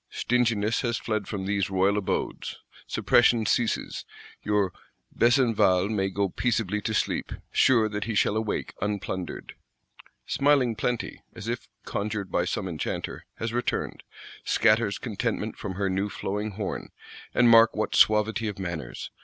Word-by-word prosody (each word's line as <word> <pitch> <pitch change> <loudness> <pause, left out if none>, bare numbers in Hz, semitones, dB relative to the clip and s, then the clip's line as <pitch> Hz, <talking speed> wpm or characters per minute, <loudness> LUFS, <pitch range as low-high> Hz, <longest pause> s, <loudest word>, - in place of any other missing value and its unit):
Stinginess 115 -3 +1
has 120 -2 0
fled 110 -3 -2
from 100 -3 -4
these 100 -1 0
royal 95 +1 +2
abodes: 105 -2 -2 0.3
suppression 120 -2 +3
ceases; 115 0 0 0.4
your 105 -3 +1 0.4
Besenval 115 -6 +3
may 95 -3 0
go 100 +1 0
peaceably 105 0 -1
to 110 - -2
sleep, - - -1 0.2
sure 115 -4 +4
that 105 -1 -3
he 115 -1 -3
shall 105 - +2
awake 110 -1 -2
unplundered. 95 -3 -4 0.7
Smiling 140 -5 +3
Plenty, 120 +2 -2
as 115 -2 -8
if 120 +1 -3 0.2
conjured 100 -1 -3
by 85 - +1
some 95 +1 -2
enchanter, 80 -4 -4
has 115 0 -4
returned; 120 0 -2 0.4
scatters 110 -2 +3
contentment 110 -1 -3
from 95 -3 -5
her 100 +1 0
new 95 +2 -1
flowing 105 +2 -3
horn. 100 0 -4 0.5
And 120 - +5
mark 115 -1 +7
what 110 - -1
suavity 110 +1 +4
of 105 - -4
manners! 90 -5 -5
105 Hz, 140 wpm, -27 LUFS, 100-115 Hz, 0.7 s, mark